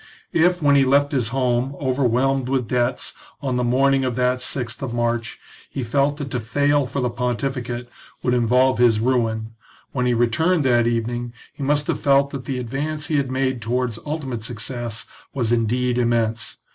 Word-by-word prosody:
If, 175 0 +3
when 140 -1 +5
he 140 - +5
left 140 +2 +3
his 130 -6 +1
home, 125 +1 0
over 130 0 0
whelmed 130 +2 +1
with 130 -3 0
debts, 125 0 0 0.3
on 135 -3 -2
the 125 - +1
morning 135 +2 +3
of 130 -2 -1
that 125 0 +1
sixth 125 -3 -3
of 125 -3 -3
March, 120 -1 -1 0.3
he 135 - -4
felt 140 +5 +1
that 140 -3 -5
to 125 - -1
fail 145 +4 +1
for 135 +3 -3
the 125 - +1
pontificate 125 0 -2 0.4
would 125 - +2
involve 125 +2 +3
his 115 -3 +4
ruin, 115 -2 0 0.4
when 125 -2 0
he 120 - +2
returned 150 +9 +2
that 120 -2 +4
evening 120 +1 -2 0.2
he - - -11
must 145 +1 +1
have - - -1
felt 140 0 +3
that 135 -3 -6
the 130 0 -2
advance 145 +5 -3
he 155 - +2
had 140 -2 0
made 130 -2 -1
towards 120 0 -1
ultimate 135 -7 -4
success 115 0 -4 0.3
was 120 -4 0
indeed 120 +2 +1
immense. 115 -3 0
125 Hz, 185 wpm, -22 LUFS, 120-135 Hz, 0.4 s, when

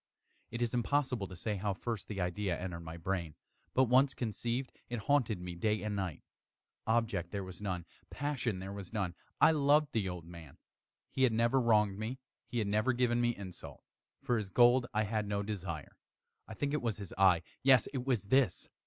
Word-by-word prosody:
It 120 +1 -2
is 120 - -1
impossible 125 -3 0
to 90 - -9
say 105 +4 -2
how 100 0 -1
first 115 0 -4
the 100 -2 -5
idea 90 0 -1
entered 90 -2 -4
my 85 0 -8
brain; 85 -3 -3 0.4
but 130 - +6
once 130 +2 +4
conceived, 120 +2 -2 0.2
it 120 -2 -3
haunted 120 -5 +2
me 90 0 -6
day 105 +5 0
and 105 -1 -2
night. 95 -6 -3 0.6
Object 110 -6 +1
there 100 0 -3
was 95 +1 -8
none. 90 -4 -3 0.2
Passion 135 -8 -2
there 95 +1 -6
was 100 -3 -7
none. 100 -6 -1 0.3
I - - +7
loved 150 0 +3
the 105 -4 0
old 90 -2 -6
man. 85 -4 -12 0.5
He 130 - -2
had 130 -3 +5
never 115 +4 +3
wronged 105 -4 +3
me. 115 +4 -3 0.3
He 120 - -4
had 110 -3 +1
never 110 +5 +2
given 120 -1 +2
me 120 -1 +2
insult. 95 -3 -9 0.4
For 120 - +1
his 105 -3 -5
gold 120 +3 +5
I 110 - +1
had 105 0 -1
no 100 0 -1
desire. 90 -7 -5 0.5
I 110 - -8
think 145 +5 -1
it 150 - 0
was 115 -3 -1
his 100 -3 -7
eye! 90 -3 +5 0.2
yes, 130 -3 +6
it 130 -3 -2
was 125 -6 +1
this! 125 0 +2
105 Hz, 195 wpm, -33 LUFS, 95-120 Hz, 0.6 s, I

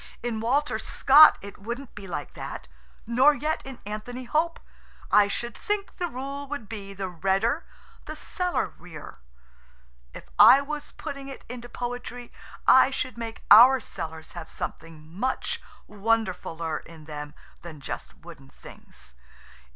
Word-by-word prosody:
"In 235 -2 -2
Walter 270 +7 +1
Scott 295 +3 +7
it 200 0 -10
wouldn't 235 +6 -6
be 200 -1 -9
like 155 -5 -5
that, - - -7 0.4
nor 260 +6 +5
yet 310 +2 -2
in 265 -2 -8
Anthony 215 +5 -6
Hope. 320 +6 0 0.5
I 205 -1 +6
should 235 +3 -4
think 415 -1 -3
the 355 - -1
rule 280 0 -6
would 280 -6 -6
be 200 -3 -7
the 195 0 -3
redder 195 - 0 0.4
the - - -7
cellarier. 180 - -4 1.0
If - - -8 0.2
I 270 - +10
was 295 +1 -5
putting 275 -1 -7
it 275 - -9
into 240 0 -8
poetry 245 0 -6 0.3
I 260 0 +7
should 255 -1 -3
make 230 -1 -7
our 250 +5 +10
cellars 160 -7 -7
have 170 -2 -8
something 160 -2 -7
much 210 +11 -2 0.3
wonderfuller 190 -7 -1
in 160 -2 -14
them 150 -1 -7 0.3
than 165 -3 -10
just 140 - -7
wooden 155 -5 -13
things. - - -14
230 Hz, 140 wpm, -26 LUFS, 175-270 Hz, 1.0 s, I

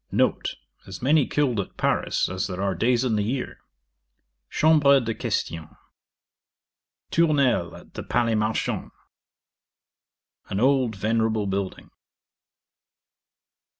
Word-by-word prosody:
N. - - +3 0.5
As - - -9
many 145 +2 +4
killed 135 -7 0
at 100 - -5
Paris - - +1
as 95 +1 -3
there 90 -2 -6
are 100 0 0
days 120 +7 +1
in 115 -4 +1
the 105 - +1
year. 125 +5 -3 0.9
Chambre 150 -3 +5
de 115 -2 -2
question. 80 -6 -4 1.3
Tournelle 140 - +2
at - - -15
the - - -5
Palais 120 -1 0
Marchand. 110 0 -1 1.6
An 100 - -2
old 130 -2 +2
venerable 110 +1 0
building. 95 -1 -4
115 Hz, 110 wpm, -24 LUFS, 100-135 Hz, 1.6 s, Chambre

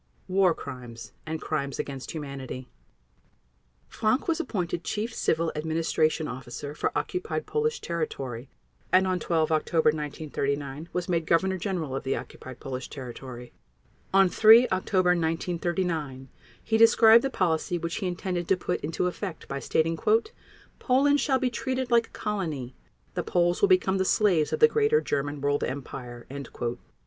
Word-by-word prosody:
War 185 -2 +3
Crimes 125 -4 -9 0.2
and 160 0 -3
Crimes 140 -4 -3
against 135 -2 -5
Humanity 135 -4 -6 1.2
Frank 225 +8 0
was 330 -1 +1
appointed 180 - -2
Chief 220 +2 -3
Civil 165 -4 0
Administration 160 0 0
Officer 125 +3 -6
for - - -1
occupied 370 +5 -3
Polish 455 +1 -1
territory 135 -7 -4 0.4
and, 185 +1 +5
on 185 -1 0
12 160 -2 0
October 160 0 +3
1939, 145 0 -3
was 180 -1 -2
made 165 -3 0
Governor 190 +3 +2
General 165 -8 -2
of 135 - -3
the 135 - 0
occupied 130 -1 -9
Polish 130 -1 -6
territory. 125 -2 -8 0.6
On 195 0 +6
3 225 +6 +7
October 185 -1 +2
1939 165 -4 -1 0.3
he 220 - +1
described 230 0 +7
the 270 - 0
policy 175 -5 0
which 170 0 -3
he 195 - -2
intended 180 -1 -3
to 190 - +3
put 180 0 -2
into 160 +4 -2
effect 180 -1 -4
by 140 - -4
stating: 165 +3 0 0.8
"Poland 285 +3 +3
shall 270 -3 +2
be 255 -1 0
treated 260 0 -2
like 235 -1 +4
a - - -14
colony; 160 - -3 0.4
the - - -1
Poles 175 0 +1
will 405 - +5
become 195 - +3
the - - +3
slaves 185 -8 +3
of - - -2
the 460 - +9
Greater 450 0 +3
German 145 - -2
World 145 0 +1
Empire." 125 -3 -6
170 Hz, 150 wpm, -27 LUFS, 145-195 Hz, 1.2 s, the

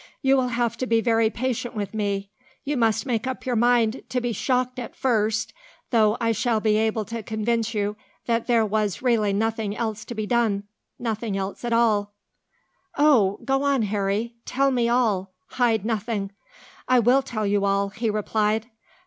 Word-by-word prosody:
"You 270 0 +4
will 260 -2 +2
have 235 -1 -1
to 255 - -2
be 230 -1 +3
very 225 -1 +2
patient 240 0 -3
with 205 -1 -4
me. 200 -2 -2 0.3
You 290 +1 -1
must 225 0 +1
make 240 -1 -1
up 260 - -4
your 250 -2 0
mind 240 0 +2
to 255 - 0
be 240 -1 -2
shocked 255 +1 0
at 240 - -7
first, 220 -3 0 0.4
though 220 -2 +3
I 230 -1 +1
shall 225 +1 +1
be 215 -1 +2
able 220 0 0
to 230 +2 -5
convince 225 +1 -1
you 205 0 -1 0.3
that 230 -1 0
there 230 -3 +3
was 210 0 -1
really 225 -5 +2
nothing 215 0 -1
else 220 -2 -3
to 240 - -7
be 215 -1 -2
done 220 -3 +1 0.3
nothing 220 -3 -3
else 195 +3 -4
at 240 - -2
all." 210 -3 +2 0.8
"Oh! 250 -10 +4
go 270 0 +1
on, 280 -4 +2
Harry. 205 +3 -1
Tell 275 +1 +1
me 240 -2 +1
all. 210 -6 +1 0.2
Hide 225 -5 +1
nothing." 215 -3 -2 0.6
"I 255 - +4
will 245 +3 +4
tell 225 -5 -3
you 200 0 +1
all," 200 0 +1
he 220 +3 -2
replied. 215 +1 0
225 Hz, 180 wpm, -24 LUFS, 210-240 Hz, 0.8 s, You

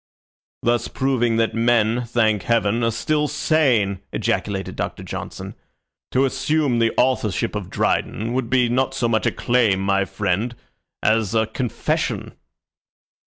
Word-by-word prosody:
"Thus 120 0 +1
proving 125 -4 0
that 115 0 +1
men, 115 +1 +2
thank 110 -3 +2
Heaven, 115 +1 +1
are 115 - +3
still 150 +6 0
sane," 130 - +1
ejaculated 95 -2 -2
Doctor - - -4
Johnson. - - -7 0.6
"To 130 +2 +2
assume 135 -1 +1
the 115 0 +3
authorship 115 -7 +1
of - - -5
Dryden 115 +3 -1
would 125 -2 -1
be 125 -1 +3
not 130 +2 0
so 125 -3 0
much 110 -2 +1
a - - +2
claim, 120 -6 +2
my 100 0 +1
friend, 100 +5 -2 0.5
as 110 -1 +2
a 110 0 +3
confession." 115 +1 -2
115 Hz, 135 wpm, -22 LUFS, 110-130 Hz, 0.6 s, are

